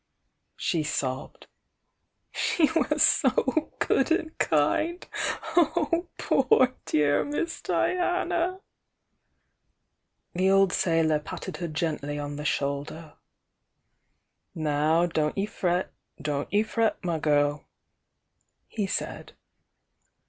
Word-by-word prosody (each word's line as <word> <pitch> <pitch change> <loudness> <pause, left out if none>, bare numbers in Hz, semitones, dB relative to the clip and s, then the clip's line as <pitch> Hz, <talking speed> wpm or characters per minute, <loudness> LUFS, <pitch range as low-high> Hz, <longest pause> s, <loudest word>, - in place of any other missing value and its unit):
she 165 - -1
sobbed. 135 -4 -3 0.9
"She 320 -3 +1
was 325 - +2
so 315 -1 +2
good 270 - +1
and 320 -1 0
kind! 305 - +1 0.5
Oh, 340 0 +2
poor, 255 - +3
dear 145 -1 +2
Miss 295 +3 -3
Diana!" 360 0 0 1.7
The 185 +2 +2
old 195 -1 +4
sailor 165 -3 +2
patted 150 - -7
her 170 0 -3
gently 155 -2 -3
on 145 0 -4
the 150 - -6
shoulder. 145 +3 -3 1.4
"Now 155 +2 +2
don't 155 -2 -1
ye 195 - +1
fret, 180 -3 -1 0.3
don't 145 -1 -3
ye 205 +1 +3
fret, 225 0 0
my 170 -2 -1
girl!" 145 -1 +1 1.0
he 210 -3 -3
said. - - -4
170 Hz, 100 wpm, -27 LUFS, -, 1.7 s, old